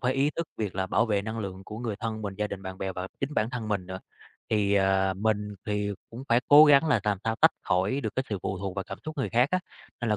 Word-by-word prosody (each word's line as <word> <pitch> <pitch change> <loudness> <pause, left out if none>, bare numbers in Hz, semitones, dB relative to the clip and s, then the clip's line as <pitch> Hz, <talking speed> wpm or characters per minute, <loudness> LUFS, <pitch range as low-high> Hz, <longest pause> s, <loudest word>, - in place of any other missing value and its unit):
phải 125 0 +1
ý 140 +2 +2
thức 165 -1 -2
việc 105 -4 -3
là 95 -1 -1
bảo 115 - +2
vệ 105 -3 +1
năng 110 +1 -4
lượng 95 -2 -5
của 105 +2 -8
người 115 -4 -3
thân 110 0 -4
mình, 100 -2 -4
gia 105 +1 -1
đình, 95 -1 -7
bạn 95 0 -7
bè 95 0 -3
và 90 0 -5
chính 140 +2 -2
bản 110 +2 +1
thân 120 -4 -4
mình 100 -4 -1
nữa. 95 0 -6 0.5
Thì, 100 -2 +2
ờ, 95 -1 +3
mình 105 0 -1
thì 105 -1 -1 0.2
cũng 120 +3 -8
phải 120 +1 +4
cố 145 +1 +10
gắng 145 +1 +6
là 145 - +3
làm 105 -2 +1
sao 115 0 0
tách - - +7
khỏi 95 +10 +1
được 110 -5 -4
cái 130 - +2
sự 105 - -2
phụ 95 0 -3
thuộc 95 -1 -4
vào 95 - -3
cảm - - -7
xúc 155 0 -6
người 135 - 0
khác 125 +4 +3
á, 185 - +2 0.4
nên 120 - -1
là 105 - +3
105 Hz, 290 wpm, -27 LUFS, 95-120 Hz, 0.5 s, cố